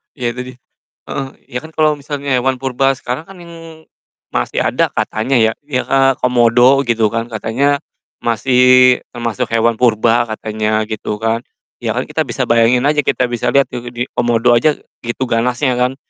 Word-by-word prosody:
Ya 125 -3 -2
tadi 125 +1 -7 0.6
heeh, 135 -1 -4 0.2
ya 125 - -5
kan 160 - -11
kalo 155 -1 +2
misalnya 140 -1 -3
hewan 130 +1 0
purba 135 +1 +1
sekarang 130 +2 -5
kan, 190 +1 -14
yang 165 -2 -12 0.5
masih - - -1
ada - - 0
katanya 120 +4 0
ya, 110 0 +3
ya, 135 -3 -3
eee, 135 0 +4
komodo 125 +2 +4
gitu 115 -3 +1
kan, 115 +2 -4
katanya 135 +6 0 0.4
masih 120 +2 0 0.6
termasuk 120 -3 -2
hewan 115 0 +1
purba, 120 0 +2
katanya 110 0 -2
gitu 105 0 -3
kan. 115 +1 +1 0.4
Ya - - -2
kan - - -1
kita - - -3
bisa - - -2
bayangin 115 +2 +3
aja, 150 +1 +2
kita 135 - 0
bisa 120 - -2
liat 140 - +4
tuh 120 -1 -6
di 120 0 -3
komodo 120 0 +2
aja, 135 +6 +3 0.2
gitu 120 +2 -4
ganasnya 125 +2 0
kan, 125 +1 +1
125 Hz, 170 wpm, -16 LUFS, 115-135 Hz, 0.6 s, eee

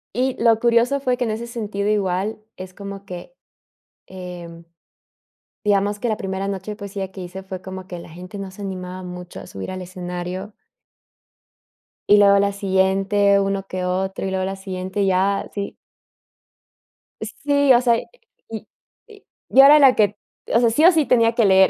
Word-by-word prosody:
Y 255 +2 +1
lo 225 -2 +5
curioso 235 +4 +3
fue 255 -2 0
que 245 - -2
en 225 - -1
ese 230 +2 -4
sentido, 210 -4 -3
igual, 200 0 0 0.2
es 185 0 -9
como 200 0 -8
que, 180 - -9 0.7
em, 175 -2 -9 1.0
digamos 205 0 +2
que 240 - -2
la 215 - 0
primera 195 -3 -3
noche 195 +1 -4
de - - -8
poesía 200 -2 -5
que 190 - -10
hice 185 +1 -7
fue 190 -1 -7
como 190 0 -8
que 175 - -6
la 170 - -11
gente 180 +4 -9
no 195 -1 -6
se 205 - -10
animaba 185 -1 -6
mucho 180 -1 -8
a - - -10
subir 95 - -6
al 185 0 -5
escenario 180 +2 -6 1.6
y 205 - +8
luego 200 -1 +6
la 200 0 +2
siguiente, 195 +1 +2
uno 195 0 -1
que 185 0 -3
otro, 190 +1 -2
y 190 - -2
luego 190 0 -1
la 195 - -3
siguiente, 190 0 -3
ya, 195 +1 +1
sí. 200 -1 -4 1.5
Sí, 285 -2 +1
o 240 - +5
sea, 235 -2 +3 0.5
y 220 -1 -7 0.4
y 425 -3 -16 0.3
yo 270 - +7
era 290 +2 +9
la 270 -3 +7
que, 205 -1 +2 0.3
o 230 - +3
sea, 235 -2 +3
sí 300 +8 +2
o 355 - +9
sí 320 -4 +2
tenía 230 -3 +4
que 230 -3 +4
leer. 190 0 +6
195 Hz, 180 wpm, -21 LUFS, 185-220 Hz, 1.6 s, era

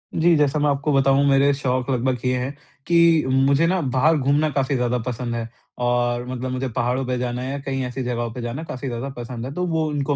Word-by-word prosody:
जी, 165 +1 +4
जैसा 150 0 +2
मैं 150 0 +2
आपको 140 +2 0
बताऊँ 135 +1 +4
मेरे 140 +1 +4
शौक 130 -2 -1
लगभग 130 -1 0
ये 125 0 +1
हैं 130 +2 -3 0.4
कि 170 -2 +5
मुझे 135 +4 +3
ना 185 +2 +1 0.2
बाहर 155 +5 +4
घूमना 145 +3 +2
काफ़ी 135 0 0
ज़्यादा 125 -1 0
पसंद 120 -1 -3
है 115 -1 -3 0.4
और 120 0 0
मतलब 130 0 -4
मुझे 130 +1 -2
पहाड़ों 125 +2 0
पे 125 0 -1
जाना 125 0 -3
है 130 +1 -4
या 140 - -3
कहीं 135 -1 -3
ऐसी 125 +1 -4
जगहों 120 -1 -2
पे 125 - -6
जाना 120 +6 -4
काफ़ी 135 -3 -6
ज़्यादा 120 +2 -4
पसंद 120 0 -6
है 135 - -6
तो 180 +3 -2
वो 160 -2 0
उनको 145 -1 -1
135 Hz, 230 wpm, -22 LUFS, 125-145 Hz, 0.4 s, कि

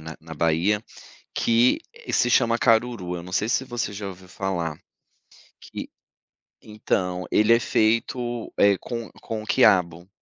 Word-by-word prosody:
na 80 0 -9
na 80 0 -10
Bahia, 85 +7 +1 0.5
que 115 +2 +3 0.3
se 125 - +2
chama: 115 0 +3
Caruru, 115 -7 +1
eu 85 - -7
não 90 - -10
sei 110 +4 0
se 130 - +1
você 120 -4 -3
já 100 0 -5
ouviu 95 -1 -10
falar, 90 -5 -3 0.8
que - - -8 0.7
então, 90 -4 -2
ele 110 +2 +5
é 115 - +4
feito, 115 +2 0
eh, 100 -1 +5
com 115 -3 -6
com 110 -1 -5
quiabo. 90 -8 +3
105 Hz, 140 wpm, -24 LUFS, 90-115 Hz, 0.8 s, ele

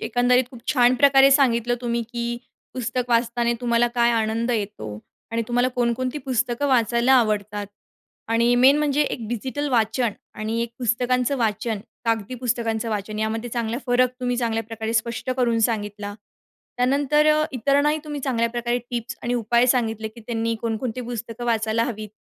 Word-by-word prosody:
एकंदरीत 245 +1 +2
खूप 250 -4 -12
छान 245 -2 +4
प्रकारे 275 +1 +6
सांगितलं 245 -4 +3
तुम्ही 235 -1 -1
की 235 -1 -3 0.5
पुस्तक 250 0 -2
वाचताना 235 0 +1
तुम्हाला 240 -1 +2
काय 235 -1 +3
आनंद 225 +1 0
येतो 200 - -3 0.3
आणि 230 0 -1
तुम्हाला 245 +1 +2
कोणकोणती 250 +2 -1
पुस्तकं 250 +1 0
वाचायला 235 0 +3
आवडतात 210 -4 +1 0.7
आणि 235 +1 +3
मेन 265 +4 +6
म्हणजे 295 -1 +1
एक 235 -5 -3
डिजिटल 260 +5 -3
वाचन 230 -1 +1 0.2
आणि 220 +2 -2
एक 235 - -4
पुस्तकांचं 250 +2 +1
वाचन, 220 -2 -1 0.3
कागदी 225 0 -1
पुस्तकांचं 230 -2 -1
वाचन 210 0 -3
यामध्ये 220 +2 -2
चांगला 235 0 -2
फरक 250 0 +3
तुम्ही 245 -1 -1
चांगल्या 230 -2 0
प्रकारे 225 0 -5
स्पष्ट 235 +3 -1
करून 240 -3 +2
सांगितला. 205 -2 -2 0.6
त्यानंतर 280 +4 +2
अ, 305 0 +4
इतरांनाही 285 +4 +2
तुम्ही 295 -1 -5
चांगल्या 235 -4 0
प्रकारे 240 0 -1
टिप्स 240 -1 -4
आणि 240 +1 -1
उपाय 235 +1 +2
सांगितले 225 -3 +1
की 220 +2 -14
त्यांनी 230 -1 -1
कोणकोणती 230 +2 -3
पुस्तकं 235 -1 -6
वाचायला 225 -1 +1
हवीत 215 -3 -5
235 Hz, 155 wpm, -23 LUFS, 225-250 Hz, 0.7 s, प्रकारे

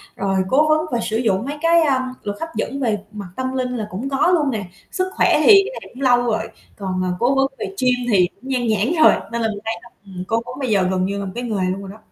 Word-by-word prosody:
rồi 195 0 -1
cố 300 +6 +4
vấn 310 +1 +3
và 240 - 0
sử 220 - -1
dụng 220 -3 0
mấy 290 +2 -4
cái, 335 0 +4
à, 260 -4 +1
luật 205 0 -4
hấp 325 - -3
dẫn 275 - -3
về 225 -6 0
mặt 205 -3 -7
tâm 260 0 -3
linh 255 -1 -1
là 215 -2 -4
cũng 230 +9 -4
có 270 +3 +2
luôn 300 -5 +2
nè. 215 -5 -3 0.3
Sức 370 0 -2
khỏe - - +3
thì, - - +3 0.2
cái 435 - -6
này - - -12
cũng 255 - -11
lâu 245 -2 +4
rồi. 220 -2 -1 0.3
Còn, 185 -2 -2
à, 180 - -1
cố 250 +3 +2
vấn 270 0 +3
về - - -2 0.2
gym 250 -1 +3 0.2
thì 185 -4 +4
cũng 265 - -12
nhan 250 -3 0
nhãn 215 - +1
rồi, - - +8 0.2
nên 235 - -2
là 225 - +1
mình 205 -1 -5
thấy 225 - -1
là, 240 - -14 0.2
ừm, 185 -2 -7
cố 225 0 +1
vấn 250 +3 -8
bây 260 - -2
giờ 200 -3 +3
gần 185 -1 +1
như 200 +1 -2
là 200 - -4
một 190 - -5
cái 245 - -3
nghề 200 -6 -1
luôn 195 +1 -4
rồi 195 - -8
đó. 210 - -12
235 Hz, 290 wpm, -20 LUFS, 200-265 Hz, 0.3 s, rồi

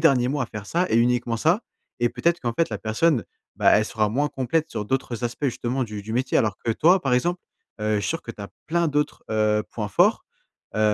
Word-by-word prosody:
derniers 135 -6 +4
mois 140 0 0
à - - -10
faire 105 -3 -7
ça 175 - 0
et 115 - +2
uniquement 120 0 +2
ça. 165 - +2 0.4
Et 120 - +3
peut-être 170 +6 0
qu'en 120 -2 -2
fait, 165 -2 +1
la 105 - -3
personne, 110 - +1 0.3
bah, - - +4
elle 110 - +2
sera 110 -1 0
moins 140 +7 0
complète 145 +4 -1
sur 105 - -4
d'autres 125 -2 -2
aspects, 120 +5 -3
justement, 125 0 -1
du 105 -2 -6
du 110 +2 -6
métier. 130 +2 +1
Alors 110 -5 +1
que 115 - +2
toi, 175 +9 +4
par 135 -2 0
exemple, 175 +9 +1 0.4
heu, 105 0 +1
je - - 0
suis 100 - -2
sûr 165 - -2
que - - -7
tu 110 - -11
as 100 - -6 0.2
plein 170 0 +1
d'autres, 150 0 -1
heu, 105 -1 +2
points 105 -3 -3
forts, 100 - +3 0.5
heu, 110 - 0
120 Hz, 240 wpm, -24 LUFS, 110-150 Hz, 0.5 s, derniers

